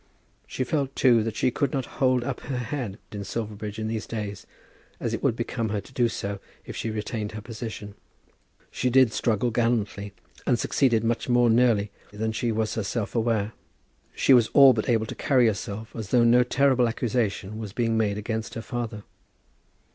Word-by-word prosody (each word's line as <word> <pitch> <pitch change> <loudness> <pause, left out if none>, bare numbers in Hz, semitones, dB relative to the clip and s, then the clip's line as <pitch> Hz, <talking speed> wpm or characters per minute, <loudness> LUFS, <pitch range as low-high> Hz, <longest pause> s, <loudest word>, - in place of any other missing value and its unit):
She 130 - -2
felt, 135 +1 -1
too, 120 -4 +5
that 110 0 -3
she 125 - +1
could 140 +1 0
not 135 -3 -1 0.2
hold 130 -2 +3
up 130 0 -3
her 130 -1 -4
head 125 -4 -4
in 105 -1 -5
Silverbridge 105 -1 -5
in 110 0 -3
these 110 0 -3
days, 105 -3 -5 0.5
as - - -2
it - - -2
would - - +2
become 115 -1 -2
her 105 0 -1
to 100 - -13
do 120 -2 +2 0.6
if - - -7
she 115 - -3
retained 105 0 -4
her 110 - -5
position. 110 -2 -7 0.8
She 125 - 0
did 130 -2 +5
struggle 115 +1 +1
gallantly, 110 -4 -1 0.3
and 125 - +3
succeeded 115 -1 +2
much 115 +2 -1
more 120 -1 +4
nearly 110 -4 +3 0.2
than 110 +2 -2
she 115 +1 -1
was 110 0 -1
herself 110 0 -2
aware. 110 -2 0 0.6
She 135 - +4
was 120 -3 +6
all 135 -2 +8
but 110 +2 -2
able 110 -2 +2
to - - -6
carry 130 -3 +3
herself 110 0 -3
as 110 -4 -5
though 120 0 +4
no 120 +1 +6
terrible 125 0 +3
accusation 110 -3 -2
was 110 -3 -6
being 115 +1 0
made 105 -2 +1
against 110 +1 -4
her 115 - -5
father. 115 -4 -4
115 Hz, 185 wpm, -26 LUFS, 110-125 Hz, 0.8 s, all